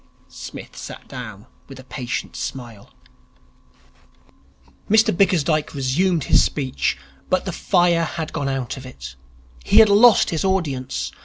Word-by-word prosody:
Psmith - - -10
sat - - -9
down 110 -5 -9 0.2
with 135 -1 -11
a - - -11
patient 125 -1 -5
smile. 120 -6 -7 2.0
Mr 220 -1 +4
Bickersdyke 165 -6 +1
resumed 155 +5 +1
his - - +4
speech. 135 -3 -2 0.3
But - - +1
the - - -3
fire 170 -1 +2
had 160 0 -5
gone 145 -3 -2
out 135 -1 -3
of 135 - -10
it. 65 - -10 0.5
He 205 - +2
had 220 -1 +8
lost 215 +2 +6
his 160 - -1
audience. 135 - -2
145 Hz, 135 wpm, -21 LUFS, 130-180 Hz, 2.0 s, had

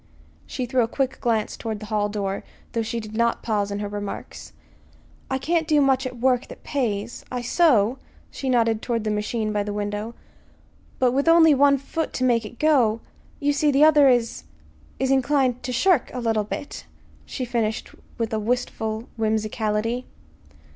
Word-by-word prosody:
She 255 - -3
threw 255 +1 +1
a 225 - +2
quick 265 +2 -2
glance 225 -3 0
toward 220 -2 -5
the 215 - -8
hall 210 -1 0
door, 200 -2 -3 0.3
though 230 - -1
she 225 +1 -3
did 215 -1 -8
not 235 +1 +1
pause 205 -3 0
in 200 - -3
her 205 - -2
remarks. 205 -1 -7 0.8
"I 265 - 0
can't 320 +3 0
do 305 -2 +4
much 265 -1 +2
at 250 -1 -8
work 250 +1 +1
that - - -12
pays. 230 -5 -2
I 250 -1 -3
sew" 245 -5 +3 0.3
she 270 - -4
nodded 230 -3 +2
toward 230 -3 -2
the 215 - -1
machine 215 +1 -2
by 205 - +1
the 205 0 -3
window 210 +2 -4 0.8
"but 255 -1 +3
with 275 +5 0
only 330 -2 +7
one 280 0 +5
foot 300 +4 -4
to 255 - -2
make 235 -3 +2
it 235 - -10
go 250 -8 +3 0.4
You 290 -2 +1
see, 295 +1 +2
the 285 +1 +4
other 295 -3 +7
is 240 - +1 0.5
is 265 +1 0
inclined 265 -2 +2
to 255 - -4
shirk 340 +3 +2
a - - -2
little," 220 -3 0 0.8
she 255 - -4
finished 225 -2 -2 0.3
with 230 -1 -2
a 220 - 0
wistful 220 -1 -2
whimsicality. 220 +2 -1
235 Hz, 175 wpm, -24 LUFS, 215-265 Hz, 0.8 s, only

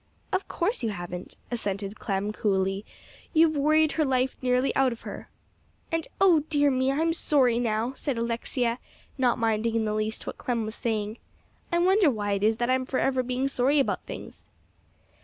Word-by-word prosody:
"Of 375 - 0
course 390 - -1
you 230 - 0
haven't," 180 -2 -6
assented 200 -3 -3
Clem 200 +1 -2
coolly. 195 -1 0 0.5
"You've 315 0 +5
worried 310 +2 +3
her 315 - +1
life 260 -2 +1
nearly 250 +1 +1
out 270 -1 +3
of 235 - -7
her." - - -8 0.6
"And 330 -1 -1
oh, 365 -5 +6
dear 290 -2 +3
me! 260 +1 +1
I'm 325 +4 +1
sorry 260 -7 +3
now," 230 +1 0
said 270 -1 -3
Alexia, 235 +1 -1 0.4
not 250 -2 +3
minding 225 0 0
in 225 -1 +1
the 210 - -1
least 215 +1 -2
what - - -6
Clem 235 -3 -1
was 215 - -5
saying. 220 -2 -2 0.5
"I 345 - +2
wonder 370 0 +4
why 205 -5 -2
it 200 0 0
is 220 +1 +3
that 240 +1 -1
I'm 260 0 +2
forever 260 0 +1
being 255 +2 -1
sorry 275 +2 +2
about 275 - 0
things." - - -8
245 Hz, 175 wpm, -27 LUFS, 215-280 Hz, 0.6 s, oh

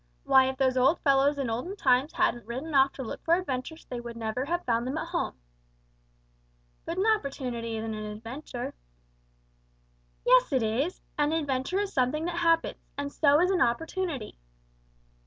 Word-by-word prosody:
Why 265 0 +6
if 265 - -5
those 260 -1 +2
old 270 +6 +4
fellows 275 0 +3
in 275 -2 -1
olden 245 - -3
times 270 -2 +2
hadn't 245 - 0
ridden 265 +7 -5
off 270 0 +5
to 265 - -6
look 225 - -7
for 330 - +4
adventures 320 -2 -4
they 245 - -5
would 235 -1 -8
never 230 +3 -2
have 345 +4 -2
found 235 0 +1
them 270 +4 -2
at 330 - -4
home." 345 - -2 1.5
"But 335 +2 -4
an 380 - +1
opportunity 255 - -1
isn't 220 0 -3
an 215 0 -5
adventure." 245 +2 -6 1.5
"Yes, - - +5
it 260 -4 +2
is, 220 +3 +1
you - - -2
stupid! - - -21 0.2
An 295 +1 +3
adventure 290 +3 0
is 410 -1 -2
something 275 +5 +1
that 345 0 -3
happens, 330 -1 +1
and 285 0 -3
so 290 -1 +4
is 365 +2 +3
an 370 - +1
opportunity." 285 - -1
275 Hz, 175 wpm, -28 LUFS, 245-330 Hz, 1.5 s, Why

